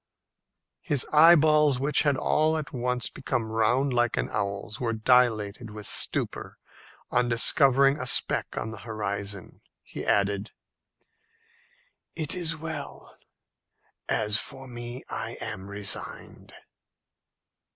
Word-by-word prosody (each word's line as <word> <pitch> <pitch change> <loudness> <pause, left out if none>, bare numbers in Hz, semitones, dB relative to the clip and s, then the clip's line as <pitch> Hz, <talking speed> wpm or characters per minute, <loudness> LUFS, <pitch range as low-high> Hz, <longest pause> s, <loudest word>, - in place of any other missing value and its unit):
His 145 -4 0
eyeballs, 150 -3 +6
which 145 +3 +2
had 145 -3 +1
all 155 +3 +1
at 150 -5 -6
once 125 -1 -2
become 120 -3 -2
quite 110 0 -8
round 125 +5 +1
like 120 -1 +1
an - - -1
owl's, 100 0 -4
were 115 -2 -1
dilated 110 -2 +2
with 105 0 -9
stupor - - -1 0.5
on 125 0 +1
discovering 135 +4 +4
a 130 - -3
speck - - +1
on 110 - -3
the 110 - -9
horizon. 100 -3 -5 0.2
He - - -8
added, 100 +1 0 1.6
"It 155 -3 0
is 165 -3 -1
well. 155 -2 -6 0.9
As 105 0 +2
for 135 0 -7
me, 120 0 -7
I - - -5
am 95 +1 -6
resigned." 100 0 -3
120 Hz, 120 wpm, -26 LUFS, 105-140 Hz, 1.6 s, eyeballs